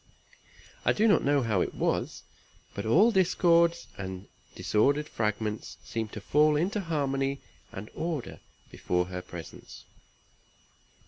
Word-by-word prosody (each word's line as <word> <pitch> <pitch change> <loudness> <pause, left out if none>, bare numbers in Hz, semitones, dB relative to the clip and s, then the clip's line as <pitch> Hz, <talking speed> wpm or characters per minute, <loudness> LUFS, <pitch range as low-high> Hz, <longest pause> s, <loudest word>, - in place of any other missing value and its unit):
I - - +3
do 220 +2 +3
not 205 - +4
know 140 -1 +2
how 105 -5 +1
it - - -2
was, - - -1 0.5
but 100 +2 -4
all 205 - +5
discords, 170 -3 +3
and 95 0 -6 0.3
disordered 140 +8 +1
fragments, 105 -2 -3
seemed 110 -2 -4
to 110 - -6
fall 150 +7 +3
into 185 +8 0
harmony 140 -5 -1 0.3
and 100 +2 -7
order 160 -6 -4 0.3
before 90 0 -1
her 90 0 -5
presence. 85 -2 -10
135 Hz, 125 wpm, -28 LUFS, 105-165 Hz, 0.5 s, all